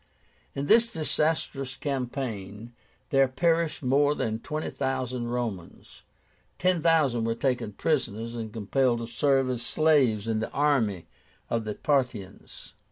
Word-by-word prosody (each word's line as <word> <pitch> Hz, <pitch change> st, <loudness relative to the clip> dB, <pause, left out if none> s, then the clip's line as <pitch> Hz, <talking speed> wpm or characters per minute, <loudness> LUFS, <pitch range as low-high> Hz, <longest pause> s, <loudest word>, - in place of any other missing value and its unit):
In 140 Hz, -, -2 dB
this 230 Hz, +8 st, +5 dB
disastrous 150 Hz, -, -1 dB
campaign 120 Hz, -6 st, -4 dB, 0.4 s
there 135 Hz, -1 st, +5 dB
perished 165 Hz, +3 st, 0 dB
more 145 Hz, +3 st, +3 dB
than 110 Hz, -5 st, -2 dB
twenty 155 Hz, +5 st, -4 dB
thousand 130 Hz, -3 st, -2 dB
Romans. 120 Hz, -7 st, -5 dB, 0.6 s
Ten 185 Hz, -2 st, +2 dB
thousand 150 Hz, -8 st, +3 dB
were 115 Hz, 0 st, 0 dB
taken 120 Hz, -4 st, -1 dB
prisoners 115 Hz, -4 st, -1 dB
and 110 Hz, -2 st, -5 dB
compelled 120 Hz, +4 st, +1 dB
to -, -, -3 dB
serve 135 Hz, +3 st, +1 dB
as 125 Hz, -2 st, -2 dB
slaves 130 Hz, -10 st, +2 dB
in 110 Hz, -1 st, 0 dB
the 110 Hz, -, -3 dB
army 120 Hz, -, +1 dB, 0.5 s
of 115 Hz, -1 st, 0 dB
the 105 Hz, -1 st, -4 dB
Parthians. 125 Hz, -9 st, -3 dB
130 Hz, 130 wpm, -27 LUFS, 115-145 Hz, 0.6 s, this